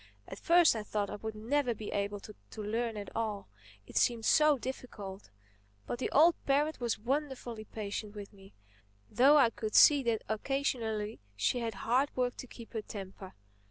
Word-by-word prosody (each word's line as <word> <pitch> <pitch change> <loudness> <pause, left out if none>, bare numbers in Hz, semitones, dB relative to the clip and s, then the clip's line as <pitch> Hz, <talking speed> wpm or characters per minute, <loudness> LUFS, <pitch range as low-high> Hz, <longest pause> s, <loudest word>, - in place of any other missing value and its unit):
At - - -8
first 345 -5 +5
I 220 - -2
thought 210 -1 -3
I - - -5
would 220 +1 -6
never 245 +3 0
be 215 0 -7
able 200 0 -2
to 210 - -11 0.3
learn 225 +1 -2
at 205 - -8
all—it 105 - -6
seemed 230 -2 +2
so 305 -2 +5
difficult. 210 -6 -7 0.6
But 240 - -4
the - - -1
old 325 +4 +6
parrot 290 +3 +1
was 240 -3 -1
wonderfully 250 -2 -3
patient 210 0 -6
with 205 0 -9
me—though 105 - 0
I 250 -5 +5
could 215 -2 -5
see 290 -2 +8
that 230 -4 -1
occasionally 220 -3 -2 0.2
she 105 - 0
had 230 -3 -3
hard 255 +5 +2
work 250 -1 0
to 255 - -8
keep 235 -1 -12
her 220 - -2
temper. 195 -2 -9
220 Hz, 165 wpm, -31 LUFS, 205-255 Hz, 0.6 s, see